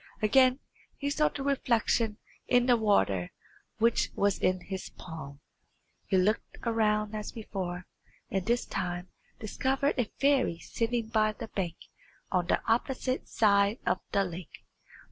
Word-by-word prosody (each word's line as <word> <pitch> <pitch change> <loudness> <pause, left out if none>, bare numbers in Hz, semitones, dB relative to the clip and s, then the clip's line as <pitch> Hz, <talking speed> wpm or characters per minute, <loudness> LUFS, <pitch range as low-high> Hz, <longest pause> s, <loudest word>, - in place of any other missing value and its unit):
Again 255 +4 +5 0.4
he 285 0 -2
saw 300 +1 +3
the 275 - -6
reflection 235 -5 +1 0.3
in 245 -1 +4
the 245 -1 +5
water 150 - +2 0.5
which 230 +1 +2
was 200 -1 +2
in 185 0 +1
his 190 +1 -6
palm. 145 -4 -9 0.7
He 190 - +2
looked 205 +4 +1
around 215 -2 +1
as 210 -1 -4
before, 185 -5 -5 0.5
and 195 -1 0
this 235 +5 +1
time 175 0 -3 0.3
discovered 265 +6 0
a 235 - 0
fairy 275 -11 +3
sitting 230 +5 -2
by 215 -1 +2
the 225 0 -8
bank 175 -4 -3 0.6
on 180 -2 +1
the - - +1
opposite 255 +2 0
side 200 0 +3
of - - +1
the 200 - +3
lake. 180 -2 -8
215 Hz, 140 wpm, -30 LUFS, 185-245 Hz, 0.7 s, Again